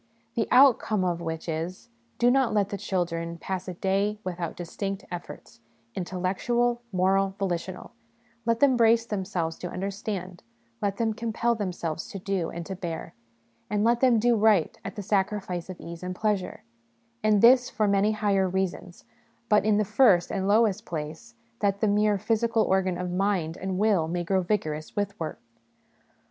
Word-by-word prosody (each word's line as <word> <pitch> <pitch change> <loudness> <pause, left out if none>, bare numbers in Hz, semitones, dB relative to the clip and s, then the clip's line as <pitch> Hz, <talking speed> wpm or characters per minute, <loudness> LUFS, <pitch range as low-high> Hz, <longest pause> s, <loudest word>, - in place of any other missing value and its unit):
The 230 - 0
outcome 240 -7 +5
of 170 -1 -1
which 160 0 -5
is 170 +7 -4 0.3
Do 245 +1 +4
not 260 -4 +2
let 205 -1 +2
the 200 - -3
children 170 -3 -2
pass 190 +2 -4
a 180 - -5
day 195 +3 0
without 175 -3 -4
distinct 195 +3 -5
efforts, 175 -7 -8 0.3
intellectual, 200 - -1
moral, 190 +1 +2
volitional; 185 -1 -3 0.5
let 230 0 0
them 275 -3 +5
brace 230 -1 +4
themselves 185 -6 -3
to 180 - -5
understand; 190 -1 -5 0.4
let 200 -1 -1
them 225 -1 0
compel 230 +1 0
themselves 175 -7 -3
to - - -7
do 190 -3 -2
and 170 0 -6
to 190 - -5
bear; 165 -3 -5 0.6
and 210 0 0
let 235 +1 +3
them 250 -3 +4
do 240 +2 +3
right 210 -6 +3
at 195 - -6
the 205 - -5
sacrifice 190 -3 -1
of 185 - -7
ease 170 0 -8
and 180 0 -4
pleasure: 205 -2 -1 0.6
and 215 -1 +3
this 250 +1 +7
for 215 -1 0
many 200 +2 +3
higher 200 -3 +1
reasons, 185 -1 -3 0.4
but, 210 - +4
in 215 -1 +3
the 210 - +2
first 210 -4 +4
and 195 -1 -1
lowest 215 0 +3
place, 170 +7 -6 0.2
that 200 -1 +1
the 215 - +2
mere 210 0 +3
physical 225 +2 +1
organ 190 -2 +1
of 180 0 -3
mind 180 -4 0
and 190 0 -3
will 200 -6 +2
may 175 +1 -2
grow 190 +2 +1
vigorous 155 -5 -2
with 205 0 -2
work. 160 -2 -4
195 Hz, 165 wpm, -27 LUFS, 180-215 Hz, 0.6 s, this